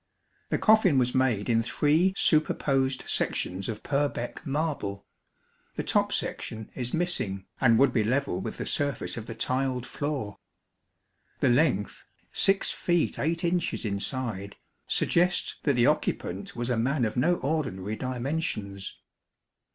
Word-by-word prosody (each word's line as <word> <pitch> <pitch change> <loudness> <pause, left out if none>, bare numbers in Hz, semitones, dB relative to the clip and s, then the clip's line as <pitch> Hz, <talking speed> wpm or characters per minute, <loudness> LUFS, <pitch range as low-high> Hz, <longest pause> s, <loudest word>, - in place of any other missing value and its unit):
The - - +1
coffin 215 -9 +5
was 125 -1 +2
made 125 -6 +1
in 115 -1 +3
three 155 +10 +2
superposed 135 -4 +2
sections 95 +3 -1
of 110 - -5
Purbeck 140 -4 -1
marble. 140 -9 -2 0.7
The - - -2
top - - +2
section 110 -1 -4
is 125 -1 -3
missing, 130 - -1 0.2
and 115 -3 +5
would 135 0 +4
be 110 - +2
level 125 -4 0
with - - -5
the - - -4
surface 145 -4 -1
of 115 -2 -6
the 115 - -6
tiled 130 +1 0
floor. 135 -10 -4 1.0
The - - +3
length, 120 - +1 0.3
6 195 0 +3
feet 175 -2 0
8 165 +4 0
inches 175 -7 0
inside, 100 -1 -3 0.3
suggests 175 +1 +1
that 145 - +2
the 120 -1 +3
occupant 95 +3 -1
was 120 +1 -2
a 120 - +1
man 130 +2 +1
of 110 - -3
no 165 +8 +3
ordinary 130 - -2
dimensions. 125 - -3
130 Hz, 135 wpm, -27 LUFS, 110-150 Hz, 1.0 s, coffin